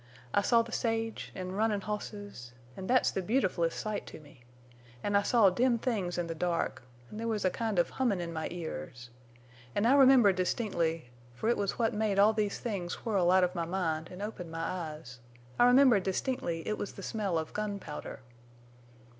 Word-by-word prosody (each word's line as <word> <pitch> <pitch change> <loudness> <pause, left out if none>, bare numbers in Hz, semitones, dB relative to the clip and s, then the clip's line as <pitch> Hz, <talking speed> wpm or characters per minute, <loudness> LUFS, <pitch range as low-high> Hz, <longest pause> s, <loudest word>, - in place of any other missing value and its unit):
I 205 - +4
saw 230 +3 +4
the 230 - -11
sage, 225 -1 -2
an' 185 -1 -5
runnin' 210 +1 0
hosses—an' 190 - -7
thet's 255 0 +3
the 190 - -2
beautfulest 185 -6 0
sight 215 -1 -4
to - - -9
me—an' 120 +2 -9
I 200 - +5
saw 205 -2 +4
dim 240 +5 +2
things 205 -8 -2
in 175 - 0
the 165 - -4
dark, 170 -2 -1 0.3
an' - - -8
there 230 +1 -3
was 215 -3 -1
a 185 - +3
kind 220 -2 -2
of 175 - +2
hummin' 240 -8 0
in 170 -1 -4
my 160 -1 -3
ears. 125 - -7 0.6
An' 205 - +1
I 245 - +5
remember 260 -7 +7
distinctly—fer 165 - -2
it 240 - +3
was 200 -1 -2
what 230 -2 +1
made 210 -2 0
all 205 +2 +6
these 210 -2 -1
things 195 -7 -4
whirl 195 -6 +2
out 185 0 +5
of 180 0 +1
my 170 -2 -2
mind 165 -3 -2
an' 185 +2 -7
opened 195 -5 -6
my 165 0 -4
eyes—I 125 - -3
remember 250 -3 +6
distinctly 190 - -2
it 215 - -2
was 205 - -4
the 195 - -9
smell 200 -6 -1
of 160 -1 -4
gunpowder. 205 -7 -5
190 Hz, 180 wpm, -31 LUFS, 165-215 Hz, 0.6 s, remember